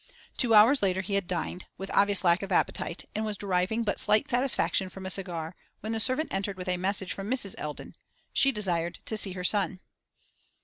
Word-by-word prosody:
Two 230 -3 +3
hours 230 +7 +7
later 190 -1 +1
he 190 +2 -5
had 200 -3 0
dined, 180 0 -3
with 195 - -6
obvious 200 -1 +4
lack 170 0 +4
of 195 -1 -6
appetite, 170 -1 0
and 215 - -2
was 215 -2 -3
deriving 195 +3 0
but 205 - -1
slight 210 +6 +3
satisfaction 240 -8 +1
from 190 +1 -10
a 190 - -1
cigar, 175 -3 -3 0.3
when 215 - -4
the 225 - -1
servant 255 +7 0
entered 195 0 -2
with 180 0 -7
a 180 - +2
message 190 +1 -1
from 195 +1 -6
Mrs. 245 -7 -1
Eldon: 150 -1 -6 0.4
she 275 - +4
desired 175 -6 -2
to 220 - -2
see 200 -3 -3
her 180 -1 -6
son. 190 -1 +1
195 Hz, 205 wpm, -28 LUFS, 180-215 Hz, 0.4 s, hours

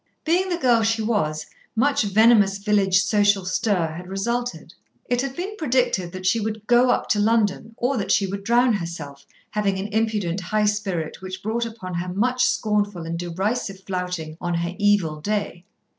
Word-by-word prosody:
Being 360 +4 +2
the 350 - 0
girl 245 -7 +3
she 225 0 +1
was, 155 -9 -1 0.3
much 275 +5 +2
venomous 210 -1 +4
village 200 -2 +2
social 205 -3 +2
stir 180 -3 0
had 180 +3 -8
resulted. 235 +6 -3 0.3
It 245 0 0
had 270 -1 -4
been 390 +4 -4
predicted 245 - +1
that 185 0 -7
she 210 +5 +3
would 215 0 -4
"go 245 +2 +4
up - - +1
to 210 - +2
London," 220 0 +1
or 255 +2 0
that 205 - -1
she 200 - +3
would 195 +1 -5
drown 240 +2 +3
herself, 165 -7 -6 0.2
having 200 -2 0
an 195 +2 -4
impudent 210 -5 0
high 210 +4 0
spirit 195 -7 -2
which 185 0 -7
brought 230 +2 -1
upon 220 -5 -8
her 175 +1 -3
much 245 +6 +1
scornful 205 -5 0
and 170 +1 -4
derisive 195 +3 -2
flouting 180 -4 -4
on 175 -1 -1
her 170 +1 -2
evil 200 -7 +2
day. 205 -2 -3
205 Hz, 175 wpm, -23 LUFS, 185-230 Hz, 0.3 s, venomous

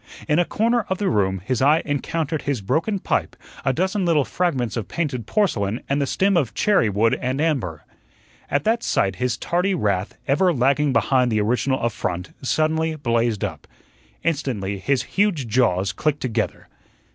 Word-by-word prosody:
In 150 +1 +3
a 175 - +3
corner 230 +4 +1
of 190 - 0
the 195 -2 0
room 95 -4 0
his 130 0 -1
eye 150 +4 +4
encountered 155 +2 -2
his 140 -4 -1
broken 160 - 0
pipe, - - -1 0.3
a 135 - +2
dozen 190 - 0
little 160 -5 +3
fragments 135 - -1
of 110 -4 -3
painted 135 -10 -3
porcelain 115 - 0
and 140 +1 0
the 140 - 0
stem 195 +6 +2
of 130 -11 0
cherry 200 - +3
wood 105 +3 +2
and 130 +2 -1
amber. 120 - -1 0.6
At 140 0 +1
that 230 +4 +1
sight 95 - 0
his 125 +2 -1
tardy 180 +6 0
wrath, 100 - -1
ever 180 +7 +3
lagging 140 +2 +2
behind 125 +1 +2
the 110 -1 +2
original 125 +5 +1
affront, 90 -6 -2
suddenly 160 +3 0
blazed 115 -6 0
up. - - -5 0.6
Instantly 120 -12 -1
his 135 +3 0
huge 190 - 0
jaws 105 -5 +1
clicked 150 -2 -1
together. 115 -3 -2
135 Hz, 170 wpm, -22 LUFS, 115-165 Hz, 0.6 s, eye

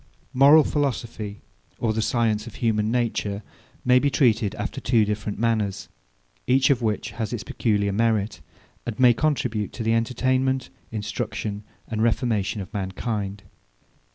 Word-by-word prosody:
Moral 140 +4 +7
philosophy, 115 -8 -2 0.4
or 110 -2 0
the 110 - 0
science 110 -1 0
of 115 - -10
human 110 -3 +1
nature, 110 -4 -1 0.4
may 125 0 +6
be 140 - +2
treated 115 -7 +2
after - - -4
two 115 -4 +3
different 105 0 -3
manners; 110 -3 -1 0.6
each 130 +2 +4
of 130 -3 +2
which 110 0 -1
has 110 0 -4
its 120 -4 -3
peculiar 105 -3 0
merit, 105 -5 0 0.5
and 120 -1 -4
may 125 -2 +7
contribute 120 -7 -1
to 115 - -4
the 115 +1 +2
entertainment, 130 +3 0 0.2
instruction, 110 -1 -4 0.2
and 110 -1 -2
reformation 110 -3 +1
of 95 +4 -9
mankind. 100 0 -3
115 Hz, 140 wpm, -24 LUFS, 105-125 Hz, 0.6 s, Moral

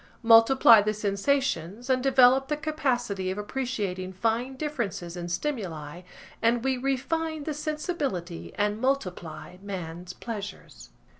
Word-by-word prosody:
Multiply 230 0 +7
the 215 +1 -1
sensations, 210 - -1
and 260 -1 +2
develop 265 0 +5
the 300 +1 -1
capacity 245 -11 -1
of 190 - -3
appreciating 205 -5 -3
fine 230 +6 -1
differences 235 - -4
in 175 -1 -5
stimuli 175 - -4 0.4
and 235 +1 +2
we 265 0 +1
refine 295 +5 -2
the 310 - -3
sensibility 290 - -3
and 210 +1 0
multiply 180 - -2
man's 180 -2 -6
pleasures. 205 - -8
230 Hz, 120 wpm, -27 LUFS, 185-270 Hz, 0.4 s, Multiply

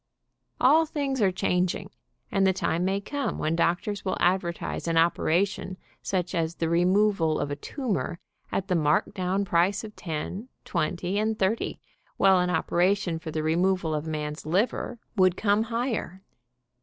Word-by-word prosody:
All 315 +5 +5
things 275 -5 -2
are 195 -2 +4
changing, 180 0 -1 0.4
and 195 -1 +3
the 190 - +3
time 175 -2 -1
may 195 +2 +1
come 280 +7 -3
when 160 +1 0
doctors 175 +5 0
will 190 - -1
advertise 175 -2 0
an 165 0 +1
operation 180 +3 +1 0.2
such 185 -2 -2
as 165 -1 -1
the 165 - -1
removal 180 -1 +3
of 145 - -2
a - - -1
tumor 205 - -3 0.3
at 195 - -1
the 185 - 0
marked 155 -2 +2
down 190 +2 -1
price 180 +4 +2
of 215 -1 -9
ten, 185 +8 -5 0.2
twenty 175 +3 -1
and 220 0 0
thirty, 200 +3 0 0.4
while 190 -1 +5
an 180 0 +1
operation 175 +1 +1
for 165 - -7
the 155 0 -2
removal 175 +1 +1
of 150 +1 -2
a - - -3
man's 150 0 -4
liver 195 +8 0 0.2
would 185 -1 +4
come 210 +1 +2
higher. 230 -5 -3
185 Hz, 160 wpm, -27 LUFS, 170-200 Hz, 0.4 s, All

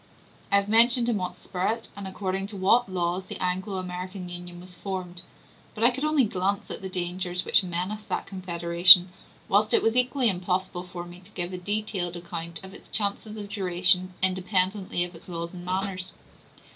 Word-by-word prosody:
I - - +5
have 200 0 +3
mentioned 235 +2 +5
in 225 - +1
what 180 -1 -3
spirit, 195 +6 -3
and 200 -1 -6
according 190 0 -3
to 205 -1 -9
what 195 +3 +3
laws, 180 +1 -1
the - - -7
Anglo 185 +2 -2
American 180 0 -5
Union 175 0 -8
was 180 0 -10
formed; 180 -2 -5 0.5
but 220 - -2
I 240 - +6
could 265 +3 -5
only 305 -3 +3
glance 200 -1 -1
at - - -6
the 190 - -5
dangers 180 0 -3
which - - +4
menace 185 +4 -3
that 205 - -2
confederation, 175 -1 +6 0.4
whilst 210 +2 +3
it - - +3
was 225 +1 +2
equally 250 0 +2
impossible 185 -1 -1
for 175 -1 -7
me 175 +1 -11
to 185 +2 -18
give 180 -3 -4
a - - -3
detailed 205 -2 -2
account 170 -1 -6
of 190 0 -10
its - - -13
chances 210 +1 -3
of 205 -1 -6
duration, 185 -2 +1
independently 185 0 0
of 175 0 -6
its 165 - -14
laws 170 0 -5
and 175 -1 -8
manners. 185 0 -3
185 Hz, 185 wpm, -27 LUFS, 180-205 Hz, 0.5 s, I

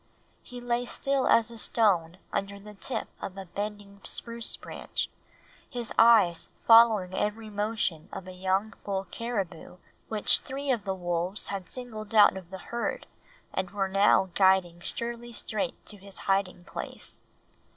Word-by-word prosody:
He 245 - -9
lay 245 0 -1
still 275 +2 0
as 230 0 +4
a 230 - -6
stone 185 -8 +2 0.2
under 200 0 -2
the 210 +1 -11
tip 225 +5 -3
of 195 0 -6
a 195 - -6
bending 200 +1 -6
spruce 235 -1 -3
branch, - - -4 0.6
his 240 -4 -2
eyes 215 -8 +6 0.2
following 225 -5 +7
every 215 +2 -2
motion 205 -6 -1
of 185 - -7
a - - -6
young 190 +4 0
bull 195 -1 -2
caribou 200 -7 -4 0.3
which 215 -2 +3
three 275 +1 -3
of 235 -5 -1
the 190 -1 -1
wolves 175 +2 -2
had 195 -2 -4
singled 225 -4 -6
out 210 -2 +7
of 185 -3 -8
the 190 - -6 0.2
herd 235 - -2 0.5
and 190 -1 -1
were 195 -1 -1
now 195 -1 +4
guiding 190 -3 +3
surely 235 +5 -5
straight 210 -5 -3
to 210 - -8
his 195 0 -11
hiding 195 -2 +1
place. - - -7
205 Hz, 150 wpm, -28 LUFS, 190-230 Hz, 0.6 s, following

